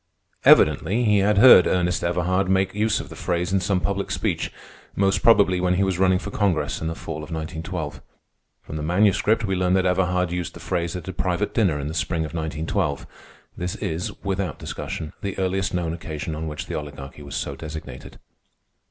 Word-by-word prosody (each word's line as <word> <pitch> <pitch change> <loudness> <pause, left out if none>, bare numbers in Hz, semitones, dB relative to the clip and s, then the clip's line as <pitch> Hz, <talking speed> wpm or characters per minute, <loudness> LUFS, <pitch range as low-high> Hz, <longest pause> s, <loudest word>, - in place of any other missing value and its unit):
Evidently 115 +6 +5
he 105 -3 +4
had 100 +1 +2
heard 100 -5 +9
Ernest 90 -1 +1
Everhard 90 +2 0
make 95 0 +2
use 105 +1 +1
of - - -7
the - - -9
phrase 90 +1 -1
in 95 - +3
some 95 0 0
public 100 +1 -2
speech, - - -1 0.4
most 95 -2 +2
probably 100 -5 +5
when 90 0 +2
he 95 - +2
was 95 -2 -1
running 95 -1 +4
for 95 - -6
Congress 80 -8 0
in 80 - -2
the 80 - -3
fall 80 -1 -6
of 75 0 -8
1912. 80 -1 -5 0.6
From 80 - -6
the - - -4
Manuscript 105 +6 +2
we 95 -2 -1
learn 90 0 +2
that 95 -1 +2
Everhard 90 -1 +1
used 90 -2 -3
the - - -9
phrase 85 0 -2
at 90 -2 -7
a 95 - -4
private 90 +3 -1
dinner 95 -11 +2
in 70 - -4
the 75 - -4
spring 80 0 -1
of 80 - -8
1912. 80 -2 -2 0.5
This 90 0 -3
is, 80 +2 -3
without 95 -1 -2
discussion, 80 -2 -6
the 100 -1 -4
earliest 95 +1 0
known 85 -2 -1
occasion 80 -2 -5
on 80 +1 -4
which 75 0 -5
the - - -7
Oligarchy 75 -1 -7
was 70 -1 -8
so - - -3
designated. 80 -5 -8
90 Hz, 195 wpm, -23 LUFS, 80-95 Hz, 0.6 s, heard